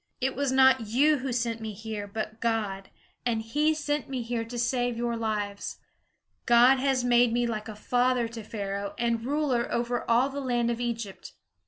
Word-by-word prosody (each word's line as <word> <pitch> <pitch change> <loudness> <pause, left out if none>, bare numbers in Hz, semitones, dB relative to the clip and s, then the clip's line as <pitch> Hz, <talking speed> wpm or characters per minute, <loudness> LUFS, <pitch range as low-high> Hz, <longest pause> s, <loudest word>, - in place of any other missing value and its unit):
It 265 0 -1
was 280 0 0
not 260 -3 +5
you 285 +7 +3
who 260 0 -3
sent 235 -1 -1
me 220 -1 -5
here, 215 0 -6
but 215 +1 -5
God; 210 -4 -1 0.3
and 235 -2 0
he 300 +7 +1
sent 295 -1 -2
me 255 -3 -3
to 235 0 -3
save 245 0 0
your 235 0 -1
lives. 210 -3 -3 0.7
God 245 +2 +6
has 265 -2 +1
made 245 -1 +4
me 240 +1 +1
like 220 -2 -3
a 215 - -7
father 245 +2 +1
to 230 0 -7
Pharaoh 200 -2 -4
and 235 -1 0
ruler 265 -3 0
over 240 0 -1
all 240 +4 +4
the 280 +1 -5
land 240 -3 0
of 235 0 -3
Egypt. 230 -5 -5
235 Hz, 180 wpm, -27 LUFS, 225-255 Hz, 0.7 s, God